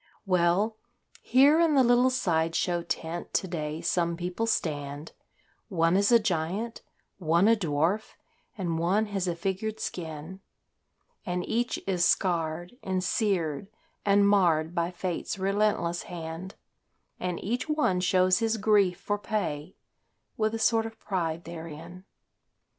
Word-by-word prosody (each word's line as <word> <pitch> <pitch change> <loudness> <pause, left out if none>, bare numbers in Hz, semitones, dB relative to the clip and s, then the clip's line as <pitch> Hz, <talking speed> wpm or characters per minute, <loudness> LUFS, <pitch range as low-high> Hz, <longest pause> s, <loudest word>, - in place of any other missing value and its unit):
Well 185 +4 +2 0.4
here 280 +6 +5
in 330 -3 +4
the 265 - +6
little 245 +1 +4
side 165 -10 0
show 175 -1 0
tent 170 0 -4
to 190 - +1
day 155 -2 -4
some 170 -1 0
people 180 +6 -2
stand, 145 -5 -2 0.6
One 165 -3 +2
is 200 +3 +3
a 235 - +8
giant, 205 +2 -2 0.4
one 170 +3 +3
a 230 - +6
dwarf, 170 +2 -1 0.4
and 170 -4 -2
one 190 +6 +2
has 190 -2 -1
a 175 - -1
figured 195 +5 -3
skin, 160 +1 -6 0.8
And 180 -2 -3
each 240 +2 -1
is 180 -3 0
scarred 175 +3 0
and 185 -1 -2
seared 185 - 0 0.4
and 200 0 +4
marred 170 -5 +3
by 170 -1 0
Fate's 180 +2 -4
relentless 195 -3 0
hand, 170 +2 -7 0.6
And 180 -1 -3
each 240 +9 -2
one 300 -12 +2
shows 185 +1 +3
his 225 -1 0
grief 200 -4 +3
for 205 0 -2
pay, 180 -7 -3 0.6
with 220 0 0
a - - -1
sort 225 0 +2
of 225 0 -12
pride 170 -4 -2
therein. 170 +2 -9
185 Hz, 135 wpm, -28 LUFS, 170-215 Hz, 0.8 s, a